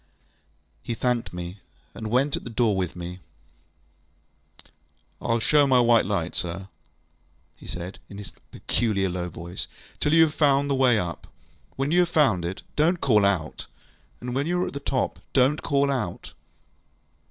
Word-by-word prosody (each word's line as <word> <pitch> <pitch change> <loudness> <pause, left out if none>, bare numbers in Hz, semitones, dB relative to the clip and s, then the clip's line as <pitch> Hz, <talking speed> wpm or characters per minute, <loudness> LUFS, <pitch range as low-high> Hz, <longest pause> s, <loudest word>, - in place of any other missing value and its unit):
ŌĆØ - - -38 0.7
He 120 - -3
thanked 125 0 0
me, 90 +2 -7 0.3
and 110 - -6
went 135 +5 +2
out - - +1
at - - -8
the - - -7
door 115 -2 +2
with 90 -3 -2
me. 90 +1 -7 2.0
ŌĆ£IŌĆÖll 115 0 0
show 145 -2 +4
my 130 -2 +5
white 120 -4 +4
light, 90 -4 -1
sir, 85 -1 -2
ŌĆØ 95 - -12 0.9
he - - -13
said, 90 +2 -6
in 100 - -9
his 105 - -8 0.2
peculiar 100 -5 0
low 90 0 -3
voice, 85 +2 -7 0.3
ŌĆ£till 150 - +1
you 165 0 +8
have 155 -2 +1
found 140 -2 +3
the - - +3
way 130 -4 +4
up. 85 -4 -4 0.5
When 135 +2 -1
you 175 - +4
have 175 -1 +3
found 125 - +3
it, 90 +3 -5
donŌĆÖt 170 +4 +3
call 105 -9 +4
out! 85 -6 -2 0.5
And 125 +1 -5
when 140 +4 0
you 180 +1 +1
are - - 0
at - - -5
the 140 - -4
top, 135 -2 -1 0.2
donŌĆÖt 135 +3 +4
call 140 0 +2
out! 130 -3 -3
120 Hz, 175 wpm, -25 LUFS, 95-140 Hz, 2.0 s, you